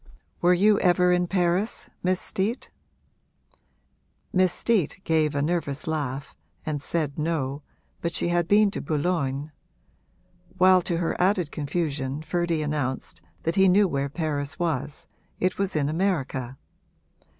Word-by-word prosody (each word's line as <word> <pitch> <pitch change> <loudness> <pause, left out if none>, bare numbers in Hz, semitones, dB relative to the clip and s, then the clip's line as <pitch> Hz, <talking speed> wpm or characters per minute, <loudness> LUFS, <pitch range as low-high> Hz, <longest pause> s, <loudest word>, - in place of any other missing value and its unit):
'Were 180 +1 +5
you 205 +3 +4
ever 180 0 +4
in 180 0 +2
Paris, 180 +3 0
Miss 185 0 +1
Steet?' 210 +6 -2 1.6
Miss 185 -1 +4
Steet 195 -4 +1
gave 155 -2 +1
a 140 - +1
nervous 155 -3 -1
laugh 140 -4 -3 0.3
and 150 -2 -2
said 150 -2 -2
No, 150 -3 -1 0.4
but 170 - -1
she 170 - 0
had 175 -1 +1
been 205 +1 +5
to - - -4
Boulogne; 150 -2 -1 1.1
while 185 0 +6
to 175 -1 -2
her 165 -1 -1
added 180 -4 +2
confusion 145 -2 -2
Ferdy 170 -1 0
announced 145 -4 -3 0.2
that 165 - 0
he 190 -1 +6
knew 200 +2 +5
where 140 -4 -1
Paris 150 -1 -3
was 150 -4 -2 0.3
it 185 +1 0
was 195 -3 -1
in 145 -2 +1
America. 145 -7 -1
165 Hz, 135 wpm, -25 LUFS, 145-180 Hz, 1.6 s, while